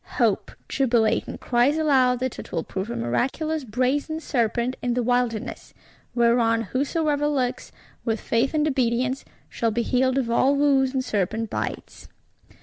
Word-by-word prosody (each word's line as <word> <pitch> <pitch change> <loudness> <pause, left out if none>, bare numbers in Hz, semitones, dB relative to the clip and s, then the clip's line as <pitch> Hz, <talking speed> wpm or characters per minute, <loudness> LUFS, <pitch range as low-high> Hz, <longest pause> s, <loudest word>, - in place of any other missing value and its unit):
Hope, - - +2 0.2
jubilating, 235 -5 +1
cries 250 +5 +2
aloud 260 -5 +3
that 260 -1 -3
it - - -9
will 165 - -1
prove 190 +3 -5
a - - -3
miraculous 270 - -1
Brazen 260 +7 -1
Serpent 240 -3 0
in 245 -1 -1
the 250 - +1
Wilderness; 245 -2 -1 0.4
whereon 235 -1 +3
whosoever 290 - 0
looks, 260 -4 -1 0.3
with 225 -2 -1
faith 240 +6 0
and 305 0 +2
obedience, 255 -1 0 0.2
shall 230 - -1
be 235 +2 -1
healed 260 +2 +1
of 240 -4 0
all 265 +4 +3
woes 275 -2 +3
and 260 -1 -2
serpent 220 +2 -1
bites. - - -5
250 Hz, 145 wpm, -24 LUFS, 230-275 Hz, 0.4 s, aloud